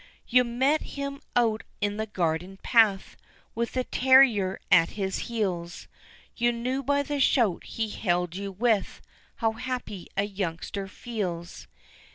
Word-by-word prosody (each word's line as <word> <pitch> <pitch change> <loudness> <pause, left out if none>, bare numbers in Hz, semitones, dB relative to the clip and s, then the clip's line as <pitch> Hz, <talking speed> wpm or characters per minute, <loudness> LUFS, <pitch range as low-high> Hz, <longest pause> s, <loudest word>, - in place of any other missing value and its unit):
You 250 0 +5
met 260 +6 +1 0.2
him 280 0 -4
out 225 -3 +2 0.2
in 205 0 -1
the 220 0 -2
garden 180 0 -2
path, 215 -5 +3 0.4
With 235 0 -2
the 255 - 0
terrier 250 -8 +4
at 165 -2 +6
his 190 -2 -2
heels, 185 -7 -3 0.5
You 240 0 +2
knew 250 +3 -2
by 285 +2 +1
the 290 0 -3
shout 235 -8 +3
he 225 -1 -3
hailed 180 -4 -1
you 200 +1 -4
with 215 +1 0 0.3
How 225 -2 +1
happy 225 -5 -5
a 200 - +3
youngster 195 -1 -4
feels. 185 -5 -5
220 Hz, 140 wpm, -27 LUFS, 190-245 Hz, 0.5 s, at